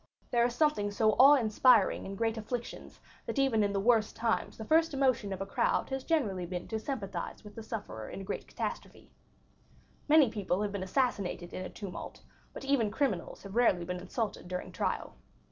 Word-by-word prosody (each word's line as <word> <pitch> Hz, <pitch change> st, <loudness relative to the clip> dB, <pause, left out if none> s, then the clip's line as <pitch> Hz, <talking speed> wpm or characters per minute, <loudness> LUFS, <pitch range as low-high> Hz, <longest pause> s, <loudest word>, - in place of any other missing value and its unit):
There 235 Hz, -1 st, +3 dB
is 240 Hz, 0 st, 0 dB
something 295 Hz, -9 st, +2 dB
so 215 Hz, +1 st, +2 dB
awe 275 Hz, +3 st, +9 dB
inspiring 225 Hz, -4 st, +4 dB
in 195 Hz, -, -6 dB
great 225 Hz, +2 st, 0 dB
afflictions 235 Hz, +2 st, -6 dB, 0.3 s
that -, -, -3 dB
even 265 Hz, -5 st, +3 dB
in 200 Hz, -, +1 dB
the 200 Hz, -, 0 dB
worst 220 Hz, 0 st, +3 dB
times 230 Hz, -1 st, -1 dB
the 220 Hz, -, -7 dB
first 320 Hz, +2 st, +3 dB
emotion 255 Hz, -7 st, +1 dB
of 190 Hz, 0 st, -4 dB
a -, -, -1 dB
crowd 195 Hz, -, 0 dB
has 265 Hz, 0 st, -2 dB
generally 210 Hz, -, 0 dB
been 180 Hz, 0 st, -5 dB
to 220 Hz, -, -2 dB
sympathize 200 Hz, -9 st, -5 dB
with 210 Hz, -1 st, -11 dB
the 225 Hz, -, -8 dB
sufferer 205 Hz, -, -6 dB
in -, -, -7 dB
a -, -, -6 dB
great 200 Hz, -, -5 dB
catastrophe. -, -, -6 dB, 1.0 s
Many 295 Hz, -6 st, +6 dB
people 200 Hz, -2 st, -1 dB
have 205 Hz, -, -2 dB
been 200 Hz, -1 st, -4 dB
assassinated 190 Hz, -4 st, -1 dB
in 185 Hz, -, -4 dB
a -, -, -6 dB
tumult, 200 Hz, -4 st, -8 dB, 0.3 s
but -, -, -8 dB
even 270 Hz, -6 st, +2 dB
criminals 205 Hz, -, -2 dB
have 195 Hz, -1 st, -9 dB
rarely 205 Hz, -7 st, +3 dB
been 180 Hz, +1 st, -4 dB
insulted 205 Hz, 0 st, -4 dB
during 180 Hz, 0 st, -5 dB
trial. -, -, -3 dB
220 Hz, 195 wpm, -31 LUFS, 195-250 Hz, 1.0 s, awe